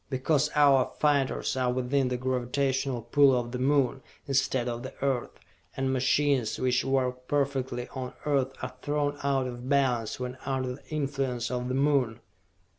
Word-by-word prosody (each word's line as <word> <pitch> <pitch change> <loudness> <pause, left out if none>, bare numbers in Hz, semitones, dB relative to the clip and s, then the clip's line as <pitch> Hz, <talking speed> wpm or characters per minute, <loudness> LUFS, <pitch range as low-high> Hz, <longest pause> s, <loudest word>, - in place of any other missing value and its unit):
Because 145 +3 +1
our 140 -3 +5
fighters 145 -4 +1
are 130 -1 +1
within 130 +2 +1
the 125 0 -1
gravitational 130 0 -1
pull 135 +2 +4
of 120 0 -5
the 125 - -4
Moon, 135 0 +2 0.2
instead 130 -2 +1
of 120 -1 -3
the 130 - -8
Earth, 135 -3 -2 0.4
and 135 0 0
machines 130 -2 +2
which 130 0 +1
work 125 -1 -1
perfectly 135 -4 -1
on 130 -2 -6
Earth 135 -3 +1
are - - -4
thrown 145 -1 -1
out 135 -2 +1
of 125 0 -6
balance 125 -6 +1
when 125 0 -5
under 130 -2 -2
the 130 - -14
influence 135 -5 -2
of 125 0 -2
the 130 - -1
Moon!" 135 -5 +2
130 Hz, 160 wpm, -28 LUFS, 125-140 Hz, 0.4 s, our